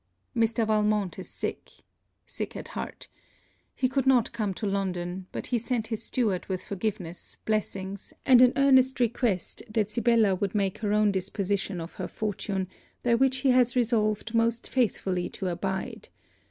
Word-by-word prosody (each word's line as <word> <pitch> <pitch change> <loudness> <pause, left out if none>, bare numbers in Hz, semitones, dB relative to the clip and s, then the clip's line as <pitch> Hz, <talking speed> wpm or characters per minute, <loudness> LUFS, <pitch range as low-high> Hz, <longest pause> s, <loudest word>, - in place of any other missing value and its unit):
Mr. 230 0 +2
Valmont 210 -3 +1
is - - -8
sick, - - -5 0.6
sick - - -6
at - - -7
heart. - - -6 0.7
He 255 - +2
could 265 0 0
not 250 -4 +4
come 215 -4 -1
to 215 - -4
London; 185 -2 -2
but - - -5
he 240 - +3
sent 235 -1 -1
his 225 -2 -2
steward 215 -7 -1
with 185 -2 -3
forgiveness, 185 -4 -4
blessings, 200 -2 -2
and 255 -2 +7
an 250 -1 +7
earnest 265 -1 +5
request 235 -5 0
that 215 -1 0
Sibella 230 -3 +3
would 195 +2 -2
make 195 -2 0
her 210 -2 -1
own 210 0 +4
disposition 195 0 -2
of 165 +1 -7
her - - -2
fortune, 200 -2 -2 0.4
by 240 - +3
which 265 +2 +3
he 265 - +6
has 250 -1 +4
resolved 220 -2 +1
most 230 0 +1
faithfully 190 -7 0
to 190 - -3
abide. 190 +2 -4
215 Hz, 160 wpm, -27 LUFS, 195-235 Hz, 0.7 s, and